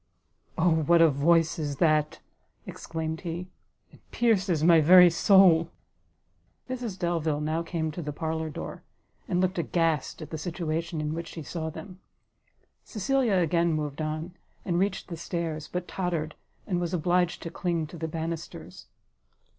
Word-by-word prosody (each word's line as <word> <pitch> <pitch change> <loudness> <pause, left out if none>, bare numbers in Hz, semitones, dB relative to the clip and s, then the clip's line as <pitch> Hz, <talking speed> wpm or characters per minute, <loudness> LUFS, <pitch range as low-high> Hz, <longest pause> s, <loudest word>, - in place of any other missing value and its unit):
"O 175 +2 +3
what 170 +3 +4
a 165 -2 +6
voice 165 +4 +2
is 145 -2 -2
that!" 155 0 +1 0.4
exclaimed 160 0 -5
he, 175 +1 -5 0.4
"it - - -19
pierces 195 -9 +1
my 165 -1 +6
very 180 +2 +8
soul!" 170 -2 +5 1.0
Mrs 245 -6 -5
Delvile 165 -4 -1
now 155 +2 -1
came 165 -2 -3
to 175 - -6
the 150 -2 -4
parlour 160 +1 -3
door, 150 - -7 0.5
and 180 - 0
looked 185 0 0
aghast 165 -3 0
at - - -11
the 160 - -4
situation 165 -1 -3
in 150 0 -2
which 165 +1 -5
she 160 - -8
saw 160 +1 -4
them: 185 +3 -10 0.8
Cecilia 235 +1 0
again 170 -1 +2
moved 150 -1 -3
on, 155 +3 -4 0.3
and 175 -1 0
reached 195 +1 -1
the 170 - -6
stairs, 165 -2 -4
but 180 0 -3
tottered, 170 -4 -3 0.3
and 180 -4 -1
was 175 0 -1
obliged 175 +1 +1
to 165 - -6
cling 170 -3 -1
to 160 +3 -10
the 160 - -3
banisters. 165 +1 -6
165 Hz, 155 wpm, -27 LUFS, 155-180 Hz, 1.0 s, very